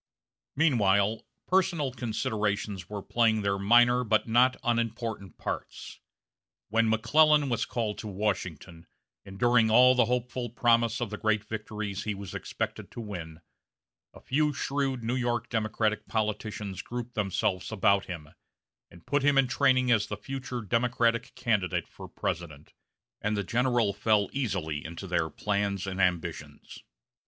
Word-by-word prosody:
Meanwhile, 110 -8 +2 0.2
personal 175 -7 +1
considerations 105 -6 -2
were 105 -2 -5
playing 110 -3 +2
their 100 -1 0
minor, 120 +4 +5
but 110 -1 +1
not 125 +3 +4
unimportant 115 -5 -2
parts. - - -6 0.7
When 115 +1 +2
McClellan 150 +6 +4
was 115 -2 0
called 110 -3 -3
to 110 - -6
Washington, 95 -5 -4 0.4
and 95 0 -11
during 120 0 +4
all 125 +3 +7
the 125 -2 +3
hopeful 125 +1 -2
promise 115 0 +2
of 115 -3 -2
the 105 - -5
great 110 -1 +1
victories 105 -2 -5
he 105 -1 -2
was 100 -1 -8
expected - - -4
to - - -7
win, 85 -7 -7 0.7
a - - -14
few 150 +2 0
shrewd 135 -3 -2
New 115 +2 -1
York 120 -2 -1
Democratic 110 -1 -1
politicians 105 -3 -3
grouped 120 +2 -6
themselves 100 -1 -1
about 100 -2 +2
him, 80 -5 -7 0.6
and 85 - -17
put 145 +3 +1
him 140 0 +3
in 135 - +5
training 130 -1 +3
as 110 -2 +3
the 105 - -5
future 130 +2 -5
Democratic 115 +2 0
candidate 90 -7 0
for - - -11
President; 80 -4 -5 0.5
and 105 0 -1
the 100 - -1
general 120 0 +1
fell 105 -1 +2
easily 95 - -2
into 85 +4 -7
their 85 -3 0
plans 100 +2 -1
and 95 0 -2
ambitions. 80 -5 -2
110 Hz, 145 wpm, -28 LUFS, 100-120 Hz, 0.7 s, all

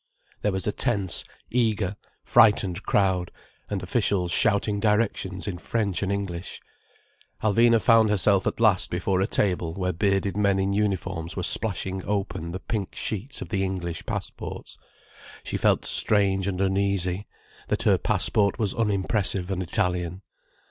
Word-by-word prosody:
There 105 - +1
was 95 -1 -2
a 105 - +1
tense, 100 -6 +1 0.3
eager, 110 -5 +1 0.3
frightened 100 -5 +4
crowd, 95 -3 +1 0.4
and - - -3
officials 90 -3 0
shouting 100 +1 +2
directions 100 -4 0
in 90 -3 -4
French 100 -2 -1
and 100 -1 -1
English. 95 -3 -4 0.8
Alvina 115 +2 +4
found 115 -1 +5
herself 100 -1 +3
at - - -2
last 110 -5 +3
before 95 +1 0
a 95 - +1
table 90 -6 0
where 90 -1 -1
bearded 100 +1 0
men 100 -2 +2
in 95 +1 0
uniforms 95 -5 -2
were 90 - -2
splashing 95 -1 -1
open 95 -5 -3
the 90 - -4
big - - -18
pink 105 -4 -3
sheets 110 +6 -4
of - - -12
the 95 -3 0
English 90 -3 -4
passports: - - -6 0.7
she - - -4
felt - - +2
strange 95 -2 +2
and 95 -2 -2
uneasy, 95 0 0 0.4
that - - 0
her - - +4
passport 100 -2 +1
was 105 -5 0
unimpressive 100 -3 0
and 95 -1 -2
Italian. 90 +1 -1
100 Hz, 150 wpm, -25 LUFS, 90-105 Hz, 0.8 s, found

